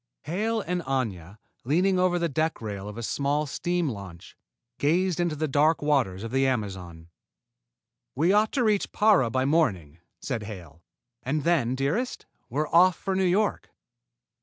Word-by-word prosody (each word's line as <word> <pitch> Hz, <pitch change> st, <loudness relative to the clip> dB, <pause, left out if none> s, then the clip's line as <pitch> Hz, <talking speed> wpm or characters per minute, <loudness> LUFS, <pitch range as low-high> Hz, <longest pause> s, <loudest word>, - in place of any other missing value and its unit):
Hale 215 Hz, +8 st, -1 dB
and 180 Hz, -1 st, -2 dB
Aña, 110 Hz, -, -3 dB, 0.3 s
leaning 180 Hz, +8 st, +2 dB
over 180 Hz, -1 st, +2 dB
the 170 Hz, -1 st, 0 dB
deck 160 Hz, +2 st, -1 dB
rail 105 Hz, -2 st, -6 dB
of 105 Hz, -, -9 dB
a 115 Hz, -, -5 dB
small 145 Hz, +5 st, 0 dB
steam 175 Hz, +4 st, -1 dB
launch, 100 Hz, -7 st, -8 dB, 0.4 s
gazed 175 Hz, +4 st, +1 dB
into 175 Hz, -3 st, 0 dB
the 155 Hz, +1 st, -1 dB
dark 150 Hz, +3 st, +3 dB
waters 125 Hz, -10 st, +1 dB
of 115 Hz, -, -6 dB
the 135 Hz, +1 st, +2 dB
Amazon. 95 Hz, -9 st, -4 dB, 1.1 s
"We 165 Hz, +8 st, +3 dB
ought 210 Hz, +1 st, +3 dB
to 255 Hz, -, +1 dB
reach 210 Hz, -3 st, +1 dB
Para 205 Hz, -, +4 dB
by 130 Hz, +2 st, 0 dB
morning," 95 Hz, -, 0 dB, 0.2 s
said 125 Hz, -5 st, -3 dB
Hale, 90 Hz, -7 st, -10 dB, 0.4 s
"and 145 Hz, +3 st, -2 dB
then, 135 Hz, -8 st, +1 dB
dearest, 150 Hz, -, -2 dB, 0.2 s
we're 150 Hz, +5 st, -1 dB
off 180 Hz, +1 st, +5 dB
for 195 Hz, -, -3 dB
New 190 Hz, -, 0 dB
York!" 200 Hz, +4 st, 0 dB
145 Hz, 160 wpm, -26 LUFS, 110-175 Hz, 1.1 s, off